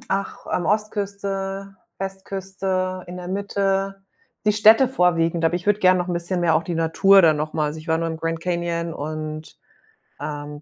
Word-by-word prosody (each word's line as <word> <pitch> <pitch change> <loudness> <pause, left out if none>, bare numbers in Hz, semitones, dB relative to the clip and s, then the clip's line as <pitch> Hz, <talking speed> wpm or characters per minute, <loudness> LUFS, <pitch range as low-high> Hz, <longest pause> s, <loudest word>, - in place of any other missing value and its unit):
ach, 195 0 -3
ähm, 175 - 0
Ostküste, 195 -1 -2 0.2
Westküste, 190 -1 -3
in 180 0 -8
der 180 0 -7
Mitte, 195 0 -1 0.4
die 210 - +5
Städte 220 +5 +6
vorwiegend, 170 -7 +1
aber 165 - +2
ich 180 +2 -3
würde 205 0 +2
gern 185 -1 +5
noch 180 0 -2
'n - - -1
bisschen 175 +1 0
mehr 170 -2 +3
auch 160 - +2
die 170 +1 -4
Natur 165 +5 +5
dann 160 -3 +5
noch 155 +1 -3
mal 155 -1 0
also, 150 +2 -4
ich 155 - -12
war 160 0 +2
nur 165 0 -1
im 160 - -4
Grand 165 0 -3
Canyon 170 -1 -2
und, 155 +1 -6 0.6
ähm, 145 0 -6
180 Hz, 185 wpm, -22 LUFS, 165-195 Hz, 0.6 s, Städte